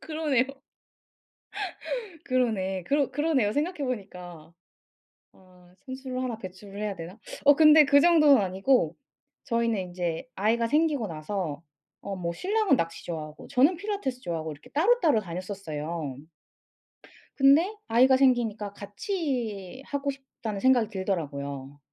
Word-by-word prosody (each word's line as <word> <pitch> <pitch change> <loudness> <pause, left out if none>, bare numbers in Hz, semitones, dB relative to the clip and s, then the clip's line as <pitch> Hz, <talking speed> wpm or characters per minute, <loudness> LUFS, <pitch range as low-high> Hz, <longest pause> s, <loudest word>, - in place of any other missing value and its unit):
그러네요. 305 -5 0 1.8
그러네. 205 -8 0
그러 280 +2 +1
그러네요 275 -7 +1
생각해 315 +4 -1
보니까. 180 -9 -7 0.8
아 180 -1 -21
선수를 260 -1 -5
하나 240 -3 -3
배출을 195 +1 -10
해야 210 -2 -2
되나? 170 +5 -9 0.3
어 285 0 +8
근데 305 -1 +8
그 285 0 +5
정도는 300 -6 +6
아니고 190 - +1 0.5
저희는 230 -5 0
인제 175 +3 -4
아이가 225 +4 +1
생기고 295 -3 +1
나서 165 0 -4 0.4
어 200 -1 -5
뭐 170 -2 -3
신랑은 390 - +1
낚시 165 -3 -3
좋아하고 155 -2 -6
저는 290 +8 +4
필라테스 340 -10 -4
좋아하고 165 -3 -3
이렇게 145 - -15
따로따로 330 - +3
다녔었어요. 170 -6 -5 1.2
근데 295 +9 +5
아이가 255 +3 +5
생기니까 230 -6 +1
'같이 230 - -4
하고 285 0 -2
싶다.'는 250 -6 -7
생각이 245 -3 +3
들더라고요. 145 -8 -4
225 Hz, 305 characters per minute, -27 LUFS, 180-275 Hz, 1.8 s, 어